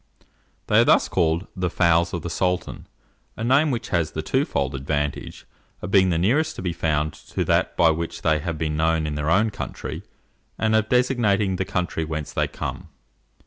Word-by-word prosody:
They -, -, +4 dB
are -, -, +7 dB
thus -, -, +4 dB
called 85 Hz, +1 st, +1 dB
the 90 Hz, -1 st, -1 dB
"fowls 85 Hz, 0 st, +2 dB
of 85 Hz, -3 st, -4 dB
the 85 Hz, -, -4 dB
sultan," 90 Hz, +1 st, -2 dB, 0.5 s
a 110 Hz, -, -4 dB
name 135 Hz, +6 st, +3 dB
which 120 Hz, -3 st, -3 dB
has 85 Hz, -3 st, 0 dB
the -, -, -3 dB
twofold 70 Hz, 0 st, 0 dB
advantage 70 Hz, +1 st, -3 dB, 0.3 s
of 90 Hz, -, -6 dB
being 95 Hz, -2 st, +5 dB
the 85 Hz, -, +1 dB
nearest 140 Hz, -, +1 dB
to -, -, -7 dB
be 90 Hz, -2 st, -1 dB
found 75 Hz, -2 st, -1 dB
to -, -, -4 dB
that -, -, +1 dB
by 85 Hz, -1 st, +5 dB
which 80 Hz, +1 st, -4 dB
they 80 Hz, -1 st, +2 dB
have 85 Hz, +1 st, -4 dB
been 75 Hz, -1 st, -2 dB
known 80 Hz, 0 st, +1 dB
in 75 Hz, -, -3 dB
their 75 Hz, +1 st, -2 dB
own 105 Hz, +5 st, +3 dB
country, -, -, -6 dB, 0.6 s
and 110 Hz, 0 st, +1 dB
of 110 Hz, 0 st, +1 dB
designating 110 Hz, -6 st, +2 dB
the 95 Hz, -, -1 dB
country 90 Hz, -3 st, -2 dB
whence 75 Hz, -2 st, -5 dB
they -, -, +1 dB
come. -, -, -6 dB
85 Hz, 190 wpm, -23 LUFS, 80-100 Hz, 0.6 s, are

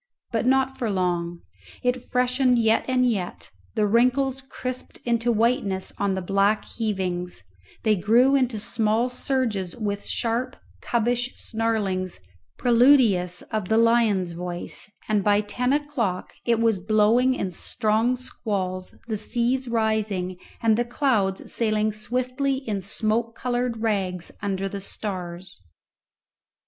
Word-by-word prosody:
But 230 Hz, +1 st, 0 dB
not 265 Hz, 0 st, +2 dB
for 235 Hz, -, 0 dB
long. 175 Hz, -3 st, -1 dB, 0.4 s
It 250 Hz, 0 st, +1 dB
freshened 250 Hz, 0 st, +2 dB
yet 225 Hz, -1 st, +3 dB
and 255 Hz, -1 st, +3 dB
yet; 180 Hz, -, -3 dB, 0.2 s
the 215 Hz, -, +2 dB
wrinkles 255 Hz, +5 st, +2 dB
crisped 255 Hz, -1 st, -6 dB
into 235 Hz, 0 st, +2 dB
whiteness 225 Hz, -4 st, 0 dB
on 200 Hz, -1 st, +1 dB
the 190 Hz, -, -3 dB
black 200 Hz, +3 st, +2 dB
heavings; 185 Hz, -5 st, -3 dB, 0.4 s
they 215 Hz, -1 st, +4 dB
grew 230 Hz, +8 st, +4 dB
into 255 Hz, -4 st, +2 dB
small 220 Hz, +3 st, +1 dB
surges 245 Hz, -8 st, -1 dB
with 205 Hz, -3 st, -3 dB
sharp 245 Hz, +3 st, -1 dB, 0.3 s
cubbish 240 Hz, +2 st, 0 dB
snarlings 210 Hz, -5 st, -1 dB, 0.4 s
preludious 235 Hz, -8 st, +4 dB
of 215 Hz, -4 st, -1 dB
the 220 Hz, -, +3 dB
lion's 225 Hz, -6 st, +3 dB
voice; 175 Hz, +2 st, -5 dB, 0.2 s
and 210 Hz, -2 st, +1 dB
by 205 Hz, 0 st, +4 dB
ten 245 Hz, +5 st, -1 dB
o'clock 280 Hz, -11 st, -1 dB
it 235 Hz, -1 st, +2 dB
was 225 Hz, -4 st, +2 dB
blowing 220 Hz, +6 st, +3 dB
in 195 Hz, -7 st, -2 dB
strong 220 Hz, +6 st, +1 dB
squalls, 190 Hz, -7 st, -4 dB
the 220 Hz, -2 st, -2 dB
seas 245 Hz, +4 st, 0 dB
rising, 215 Hz, -5 st, 0 dB, 0.3 s
and 220 Hz, -1 st, +4 dB
the -, -, +3 dB
clouds 235 Hz, -7 st, 0 dB
sailing 215 Hz, -2 st, +1 dB
swiftly 255 Hz, +5 st, -1 dB
in 220 Hz, -7 st, -3 dB
smoke 220 Hz, +4 st, -1 dB
coloured 245 Hz, -2 st, -2 dB
rags 190 Hz, -5 st, -1 dB
under 195 Hz, -1 st, -1 dB
the 195 Hz, 0 st, -5 dB
stars. 180 Hz, -, -6 dB
220 Hz, 130 wpm, -25 LUFS, 195-245 Hz, 0.4 s, they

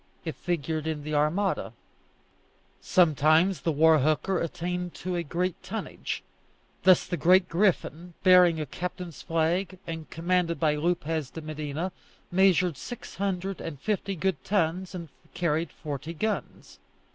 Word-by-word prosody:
It 160 Hz, -, -2 dB
figured 160 Hz, -2 st, -2 dB
in 155 Hz, -2 st, -3 dB
the 155 Hz, +1 st, -4 dB
Armada. 155 Hz, +7 st, +1 dB, 1.1 s
Sometimes 160 Hz, +1 st, +4 dB
the 165 Hz, -, +1 dB
war 160 Hz, +1 st, +5 dB
hooker 155 Hz, +6 st, +1 dB
attained 175 Hz, +1 st, -3 dB
to 180 Hz, 0 st, -3 dB
a 175 Hz, -, 0 dB
high 175 Hz, +3 st, -1 dB
tonnage; 220 Hz, +3 st, -5 dB, 0.6 s
thus 185 Hz, -2 st, +5 dB
the 175 Hz, -1 st, -3 dB
Great 180 Hz, +4 st, +5 dB
Griffin, 175 Hz, -2 st, 0 dB
bearing 180 Hz, -3 st, +6 dB
a 155 Hz, -, -2 dB
captain's 175 Hz, +1 st, -6 dB
flag, 170 Hz, +4 st, 0 dB
and 160 Hz, -1 st, -6 dB
commanded 170 Hz, 0 st, 0 dB
by 155 Hz, -2 st, +3 dB
Lopez 160 Hz, -2 st, -1 dB
de 160 Hz, -, -8 dB
Medina, 155 Hz, +3 st, -4 dB, 0.4 s
measured 180 Hz, -3 st, +3 dB
six 245 Hz, -, -8 dB
hundred 195 Hz, 0 st, -2 dB
and 145 Hz, -5 st, -6 dB
fifty 200 Hz, +2 st, -1 dB
good 175 Hz, -6 st, -1 dB
tons, 185 Hz, -1 st, 0 dB
and 170 Hz, -3 st, -6 dB, 0.3 s
carried 165 Hz, -1 st, 0 dB
forty 150 Hz, +2 st, -6 dB
guns. 215 Hz, +6 st, -4 dB
170 Hz, 135 wpm, -27 LUFS, 155-185 Hz, 1.1 s, bearing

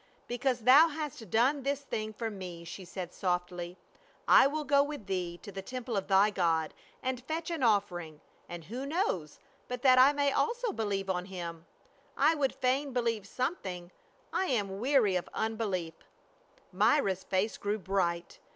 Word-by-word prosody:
" -, -, -35 dB
Because 245 Hz, 0 st, -1 dB
thou 270 Hz, +8 st, +8 dB
hast 295 Hz, -, -6 dB
done 255 Hz, -, +3 dB
this 280 Hz, +1 st, -1 dB
thing 215 Hz, -6 st, -4 dB
for 225 Hz, +1 st, -4 dB
me," 180 Hz, -4 st, -7 dB
she 175 Hz, +3 st, -8 dB
said 180 Hz, 0 st, -6 dB
softly, 180 Hz, -1 st, -2 dB, 0.3 s
" -, -, -33 dB
I -, -, +8 dB
will 305 Hz, +2 st, -2 dB
go 280 Hz, -1 st, +4 dB
with 285 Hz, -6 st, -4 dB
thee 180 Hz, -3 st, -3 dB
to 200 Hz, -, -8 dB
the 195 Hz, 0 st, -6 dB
temple 250 Hz, +2 st, -5 dB
of 195 Hz, -1 st, -1 dB
thy 195 Hz, +2 st, +5 dB
God, 165 Hz, -5 st, +1 dB, 0.3 s
and 255 Hz, -1 st, -2 dB
fetch 320 Hz, +4 st, -3 dB
an 330 Hz, -4 st, -3 dB
offering, 180 Hz, -9 st, +1 dB, 0.3 s
and 175 Hz, -1 st, -7 dB
who 245 Hz, -, -5 dB
knows 280 Hz, -, -1 dB, 0.3 s
but 250 Hz, -1 st, -5 dB
that 255 Hz, -1 st, +7 dB
I 265 Hz, +3 st, +8 dB
may 285 Hz, -1 st, +1 dB
also 470 Hz, -, 0 dB
believe 200 Hz, -, -2 dB
on 180 Hz, -1 st, -1 dB
him; 170 Hz, -3 st, -7 dB, 0.5 s
I 320 Hz, -, +5 dB
would 280 Hz, -4 st, 0 dB
fain 265 Hz, +2 st, 0 dB
believe 230 Hz, -5 st, -1 dB
something 190 Hz, -, -4 dB, 0.2 s
— -, -, -35 dB
I 380 Hz, -, +1 dB
am 210 Hz, -7 st, 0 dB
weaiy 210 Hz, -2 st, +2 dB
of -, -, -11 dB
unbelief" 205 Hz, -7 st, -2 dB, 0.8 s
Myra's 200 Hz, -1 st, +2 dB
face 195 Hz, +3 st, -1 dB
grew 205 Hz, +1 st, -1 dB
bright. 180 Hz, -3 st, -1 dB
215 Hz, 175 wpm, -31 LUFS, 185-265 Hz, 0.8 s, thou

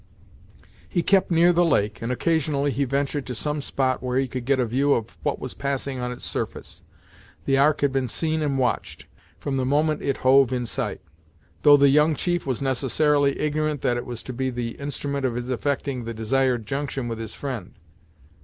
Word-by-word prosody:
He 175 Hz, -, 0 dB
kept 195 Hz, -1 st, +3 dB
near 170 Hz, +1 st, +5 dB
the 175 Hz, +1 st, +4 dB
lake, 105 Hz, -10 st, +1 dB
and 115 Hz, +2 st, -2 dB
occasionally 145 Hz, 0 st, 0 dB
he 140 Hz, +1 st, 0 dB
ventured 140 Hz, +1 st, -1 dB
to 125 Hz, -, -4 dB
some 150 Hz, +5 st, -2 dB
spot 130 Hz, -2 st, 0 dB
where 125 Hz, 0 st, -1 dB
he 135 Hz, 0 st, +1 dB
could 125 Hz, -1 st, -5 dB
get 135 Hz, 0 st, +2 dB
a 125 Hz, -, +2 dB
view 135 Hz, +5 st, +2 dB
of 110 Hz, -6 st, -3 dB
what -, -, -1 dB
was -, -, -6 dB
passing 140 Hz, -1 st, -3 dB
on 125 Hz, 0 st, -3 dB
its 125 Hz, -, -7 dB
surface. -, -, -4 dB, 0.6 s
The 135 Hz, 0 st, +2 dB
Ark 150 Hz, +2 st, +3 dB
had 140 Hz, -1 st, +2 dB
been 135 Hz, -2 st, 0 dB
seen 160 Hz, +5 st, -1 dB
and 140 Hz, -3 st, 0 dB
watched, 125 Hz, -2 st, -1 dB, 0.3 s
from 135 Hz, -2 st, -3 dB
the 130 Hz, -, 0 dB
moment 150 Hz, +4 st, +1 dB
it 140 Hz, -, -1 dB
hove 135 Hz, 0 st, +6 dB
in 125 Hz, -1 st, -1 dB
sight, 115 Hz, -, -3 dB, 0.6 s
though 145 Hz, -1 st, +8 dB
the 140 Hz, 0 st, +5 dB
young 150 Hz, +3 st, +4 dB
chief 175 Hz, 0 st, -1 dB
was 130 Hz, 0 st, -1 dB
necessarily 140 Hz, +2 st, +2 dB
ignorant 150 Hz, -1 st, -1 dB
that 120 Hz, -, +1 dB
it 120 Hz, -, -5 dB
was 120 Hz, -2 st, -6 dB
to 130 Hz, -, -6 dB
be 130 Hz, +2 st, -1 dB
the 120 Hz, -2 st, -3 dB
instrument 140 Hz, 0 st, -3 dB
of 125 Hz, -3 st, 0 dB
his 120 Hz, +1 st, -3 dB
effecting 135 Hz, 0 st, -2 dB
the 115 Hz, 0 st, -5 dB
desired 120 Hz, +1 st, +1 dB
junction 135 Hz, 0 st, -3 dB
with 115 Hz, -1 st, -4 dB
his 110 Hz, -1 st, -6 dB
friend. 130 Hz, -9 st, -6 dB
135 Hz, 200 wpm, -24 LUFS, 125-145 Hz, 0.6 s, though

